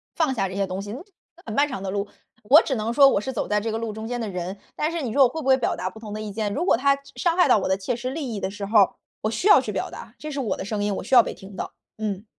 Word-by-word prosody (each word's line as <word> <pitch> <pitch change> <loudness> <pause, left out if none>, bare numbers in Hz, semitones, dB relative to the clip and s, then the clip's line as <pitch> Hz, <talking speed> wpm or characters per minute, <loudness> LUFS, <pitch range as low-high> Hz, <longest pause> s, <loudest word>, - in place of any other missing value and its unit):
放 310 -5 +1
下 195 -5 0
这 185 - -7
些 200 - +1
东 185 +1 -4
西， 205 +1 -7
呃， 275 - -7 0.4
很 220 - -5
漫 285 +5 +3
长 245 -9 -6
的 190 - -3
路。 200 +1 -2 0.4
我 290 +8 +8
只 270 - -2
能 220 -1 -1
说 275 +3 +7
我 205 - +2
是 265 - -4
走 245 - -3
在 210 0 +2
这 225 0 -2
个 220 - -2
路 225 -2 -4
中 220 +1 -6
间 245 0 -3
的 225 - -3
人， 185 0 -4 0.2
但 305 +2 -1
是 335 -3 -3
你 235 -4 -3
说 280 - +3
我 250 - +5
会 320 - -5
不 - - -5
会 265 - +7
表 245 - 0
达 185 - -3
不 220 - -13
同 215 -2 -9
的 215 - -4
意 215 -1 -5
见？ 210 0 -2
如 335 - -1
果 - - +5
他 275 +3 +3
伤 280 - -17 0.3
伤 - - -6
害 360 - +5
到 220 - +5
我 - - -2
的 190 - +2
切 215 +5 -2
实 250 +2 -4
利 270 -5 -4
益 205 - -3
的 190 - -2
时 205 0 -6
候， 205 -2 +4 0.3
我 215 - 0
需 230 - -1
要 415 - +8
去 - - -4
表 - - -3
达， - - -10
这 305 0 -7
是 285 - -4
我 245 -6 -1
的 - - -5
声 205 0 -2
音， 205 -1 0
我 - - -4
需 - - -5
要 245 - +10
被 - - -5
听 195 0 -12
到， - - -5 0.3
嗯。 210 -1 -3
220 Hz, 375 characters per minute, -24 LUFS, 205-265 Hz, 0.4 s, 要